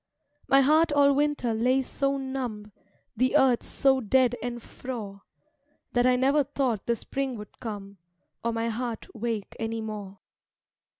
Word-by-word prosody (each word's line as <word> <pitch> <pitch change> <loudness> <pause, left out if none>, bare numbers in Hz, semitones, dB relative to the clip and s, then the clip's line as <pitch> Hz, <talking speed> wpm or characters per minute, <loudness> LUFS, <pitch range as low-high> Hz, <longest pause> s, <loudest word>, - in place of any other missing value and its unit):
My 275 0 +6
heart 310 +4 +4
all 285 -1 +5
Winter 285 -4 +1
lay 250 +4 +2
so 275 +2 -1
numb, 250 -6 -4 0.4
The 255 +5 +3
earth 260 -4 +4
so 270 -1 +2
dead 245 +2 +3
and 240 0 -4
frore, 225 -5 -7 0.7
That 245 0 +3
I 255 - +5
never 275 +3 +3
thought 260 -6 -2
the 235 - +2
Spring 270 +1 -3
would 210 0 -11
come, 200 -4 -7 0.4
Or 235 - +1
my 230 0 -1
heart 230 0 -4
wake 225 -2 -3
any 225 0 -2
more. 210 -3 -6
245 Hz, 145 wpm, -27 LUFS, 225-270 Hz, 0.7 s, My